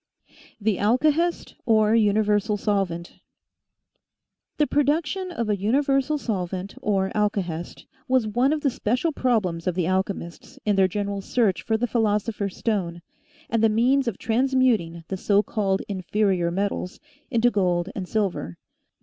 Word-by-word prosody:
THE 210 -2 0
ALKAHEST 305 - +1
OR 215 -1 +4
UNIVERSAL 210 -1 +2
SOLVENT 195 -5 -2 1.4
HE 300 - +3
production 310 +6 0
of 235 -10 -3
a 210 - +2
universal 275 +6 +1
solvent 190 -6 -3
or 195 -2 0
alkahest 185 -5 -2 0.2
was 255 -3 +2
one 245 +6 +1
of 305 -1 0
the 275 - +1
special 250 +9 0
problems 205 - 0
of 180 - 0
the 180 -2 0
alchemists 185 -2 -3
in 210 -1 +2
their 190 -1 +4
general 200 +1 -3
search 205 -3 +1
for 220 - 0
the 240 - 0
philosopher's 210 -3 -1
stone 175 -6 -2 0.4
and 230 -1 0
the 225 - +6
means 250 +5 +2
of 230 - -2
transmuting 230 -8 +1
the 190 - -3
so 200 +2 +2
called 195 -2 -1
inferior 190 -2 0
metals 190 0 -3 0.3
into 240 -1 +3
gold 180 -3 +1
and 190 -3 -5
silver. 195 - -2
210 Hz, 140 wpm, -24 LUFS, 190-245 Hz, 1.4 s, the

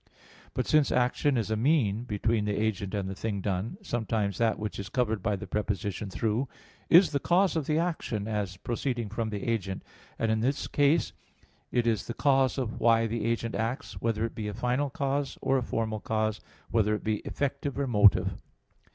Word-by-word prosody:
But - - 0
since 155 -3 +3
action 125 +2 +2
is 110 -1 -1
a - - +2
mean 120 -3 +2
between 110 0 0
the 105 0 -1
agent 105 -2 -1
and 100 -2 -2
the 95 - -3
thing 100 +1 -3
done, 95 - -2
sometimes 110 - -1
that 115 -2 +2
which 105 -1 -4
is 100 0 -5
covered 110 -4 0
by 105 +1 0
the 100 - -6
preposition 105 0 -2
"through" 115 +6 -1 0.4
is 170 -1 +7
the 140 - +1
cause 185 +4 +3
of 155 -4 -1
the 155 - +2
action, 160 - -1
as 105 -4 -2
proceeding 120 +1 -2
from 110 +1 -2
the 105 -2 -4
agent; 100 -5 -2 0.3
and 115 -1 +1
in 110 - +1
that 135 +5 0
case 145 +3 +3 0.6
it 120 -1 +1
is 110 -4 0
the 120 - -4
cause 135 -2 +3
of 125 -4 -3
why 115 0 +4
the 115 0 -2
agent 115 0 -1
acts, 115 -5 -3
whether 115 -1 0
it 115 - -5
be 110 -2 -4
a 105 - -4
final 125 +5 0
cause 140 -1 -2
or 135 0 +2
a - - -3
formal 110 -2 -2
cause, 110 0 -1 0.3
whether 105 -2 +3
it - - -6
be 110 -1 0
effective 140 +3 -3
or 140 - 0
motive. 105 -5 +4
115 Hz, 195 wpm, -29 LUFS, 105-130 Hz, 0.6 s, is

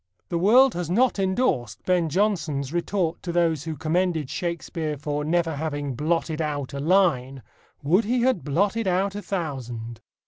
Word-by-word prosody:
The 170 - -1
world 245 +8 +6
has 175 -2 -4
not 235 +4 +2
endorsed 185 - 0
Ben 175 -3 +2
Jonson's 155 -6 0
retort 175 -1 -1
to 175 - -4
those 165 -4 +1
who 160 -2 -4
commended 160 -1 0
Shakespeare 165 -3 -3
for 150 +1 -3
never 165 0 0
having 145 -2 -3
"blotted 160 +3 -1
out" 145 -3 -3
a 140 - -4
line: 140 -6 +2 0.4
"Would 180 +10 +3
he 245 +3 +1
had 255 - +2
blotted 200 - 0
out 190 +2 +1
a 205 - -5
thousand!" 125 - -5
165 Hz, 160 wpm, -25 LUFS, 145-185 Hz, 0.4 s, world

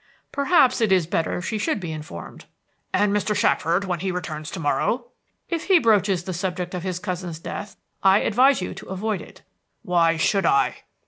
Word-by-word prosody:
"Perhaps 280 -4 +3
it 220 -3 +2
is 185 -3 +4
better 165 +2 -1
she 215 +4 -2
should 310 +2 0
be 175 -4 -5
informed." 150 - -8 0.5
"And 205 -1 +2
Mr. 210 +1 0
Shackford, 170 +4 +2
when 180 -3 -2
he 190 +2 -2
returns 155 -4 -5
to 190 - -6
morrow?" 230 - 0 0.4
"If 335 -2 -3
he 380 -2 +6
broaches 205 - +2
the 185 - -4
subject 180 0 -3
of 180 - -3
his 185 -1 -3
cousin's 180 -3 -4
death, 205 +5 -7 0.3
I 195 +1 +5
advise 255 +2 +4
you - - -4
to - - -11
avoid 200 +2 -2
it." - - -14 0.4
"Why 170 -4 +2
should 195 +5 +2
I?" 410 +1 +1
190 Hz, 185 wpm, -23 LUFS, 170-215 Hz, 0.5 s, he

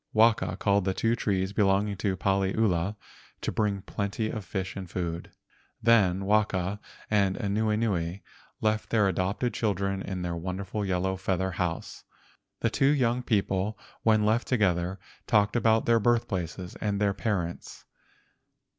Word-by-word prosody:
Waka 110 0 +3
called 100 -2 +2
the 95 -1 0
two 115 +1 +1
trees 95 -3 -1
belonging 100 0 +2
to 95 -2 -1
Paliula 95 0 +1 0.5
to - - -2
bring 100 -3 -1
plenty 105 +2 -2
of 110 -3 -5
fish 95 +2 -4
and 95 -3 -6
food. 85 -1 -4 0.5
Then 100 -5 +3
Waka 100 -2 +1 0.3
and 100 -3 +3
Anuenue 105 -4 0 0.4
left 110 0 0
their 105 -3 +3
adopted 95 +6 -1
children 100 -3 -1
in 95 -2 -4
the 85 -1 -2
wonderful 95 +4 -4
yellow 95 0 0
feather 95 0 -1
house. 85 -2 -3 0.6
The - - +1
two 135 - +3
young 125 -4 +2
people, 100 -3 0 0.2
when 110 -2 +3
left 110 +3 +2
together, 95 -6 +1 0.3
talked 105 0 +3
about 115 -2 +3
their 115 -1 +4
birthplaces 95 -6 -1
and 100 -2 -1
their 100 -1 +2
parents. 95 -5 -3
100 Hz, 135 wpm, -28 LUFS, 95-110 Hz, 0.6 s, their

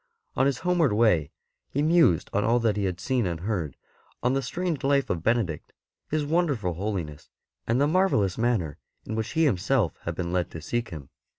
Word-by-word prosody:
On 135 - +3
his 140 -3 0
homeward 170 -9 +3
way 105 -9 +3 0.4
he 145 - -1
mused 160 - +3
on 105 - +1
all 120 +3 +3
that 110 -3 +2
he 100 -1 -1
had 90 -1 -2
seen 120 +2 0
and 85 -1 -4
heard; 90 -8 -3 0.5
on 125 +2 +2
the 135 - +1
strange 165 +3 -3
life 140 0 +2
of 85 - -2
Benedict, 110 -6 -1 0.4
his 155 -1 0
wonderful 145 - 0
holiness, 85 -5 -4 0.4
and 115 +3 +2
the 140 - +4
marvellous 150 - +2
manner 110 - 0 0.3
in 110 - -5
which 110 +4 -3
he 160 0 +3
himself 110 - +1
had 85 - -3
been 85 0 -3
led 90 -1 0
to 80 - -8
seek 120 +9 -3
him. 75 -5 -9
110 Hz, 195 wpm, -26 LUFS, 90-140 Hz, 0.5 s, the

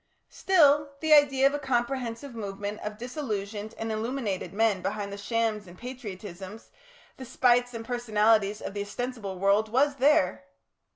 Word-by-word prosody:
Still, 295 -6 +3
the 315 0 +3
idea 275 -3 +5
of 275 - +4
a 290 - -2
comprehensive 250 -1 -2
movement 205 -1 -5
of 210 0 -6
disillusioned 220 -4 -5
and 225 0 -3
illuminated 220 -3 -3
men 210 -2 +1
behind 200 0 -3
the - - -6
shams 220 -1 -1
and 175 +1 -13
patriotisms, 205 -4 -9 0.5
the 260 - -8
spites 245 0 +2
and 225 0 -6
personalities 215 -3 +2
of - - -5
the 205 - -3
ostensible 205 -2 -5
world 200 +3 +2
was 280 +5 +2
there." 285 +1 +3
225 Hz, 150 wpm, -27 LUFS, 205-260 Hz, 0.5 s, idea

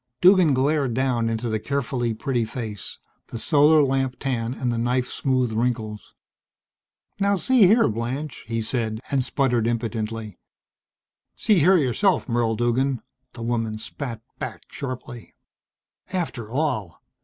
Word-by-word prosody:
Duggan 180 -6 +6
glared 135 -2 +1
down 125 -3 +1
into 115 +1 -2
the 110 -1 -1
carefully 125 -1 -1
pretty 125 0 -1
face, 110 -2 -6 0.3
the - - -6
solar 150 +4 +5
lamp 135 -1 0
tan 120 -4 -1
and 125 -2 -1
the - - -2
knife 125 +2 +1
smoothed 130 -4 0
wrinkles. 110 -2 -2 1.0
"Now 200 0 +3
see 235 +1 +5
here, 225 +5 +5
Blanche," 120 +5 -4
he 115 -1 -2
said, 110 -2 -2
and 135 -2 +2
spluttered 125 -3 +1
impotently. 115 -3 -3 1.0
"See 210 -5 +3
here 180 +5 +6
yourself, 165 - +2
Merle 115 -2 +1
Duggan," 120 +2 0 0.3
the 120 - -7
woman 115 -2 -1
spat 115 0 -6 0.2
back - - -6
sharply. 130 -3 -7 0.8
"After 160 - -3
all! 125 - -2
125 Hz, 130 wpm, -24 LUFS, 115-140 Hz, 1.0 s, Duggan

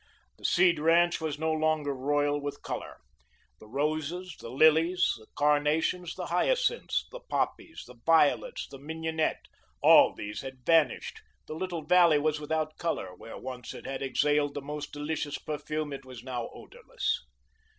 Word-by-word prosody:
The - - -10
Seed 175 -3 +4
ranch 170 +2 +3
was 155 -3 -2
no 160 +1 0
longer 155 -2 +1
royal 145 +2 0
with 145 0 -6
colour. - - -5 0.6
The - - -14
roses, 155 +7 -2
the 115 - -8
lilies, 160 +7 +4
the 110 - -17
carnations, 150 +4 +1
the - - -5
hyacinths, - - +1
the - - -8
poppies, 335 - -3
the 125 - -13
violets, 165 - +3
the 135 - -11
mignonette, 160 +2 -2 0.3
all - - +7
these 105 +1 -6
had 130 -2 -9
vanished, 165 -2 +2 0.2
the - - -7
little 170 0 -4
valley 170 -1 +5
was 150 +1 0
without 155 +1 -2
colour; 95 - -2
where 115 - -10
once 125 -2 -7
it - - -10
had 135 - -4
exhaled 145 +1 +1
the 145 - -3
most 150 +1 -6
delicious 145 0 -3
perfume, 155 0 -4
it 135 - -7
was 130 -3 -11
now 125 -3 -4
odourless. 485 +1 -4
150 Hz, 155 wpm, -29 LUFS, 145-165 Hz, 0.6 s, all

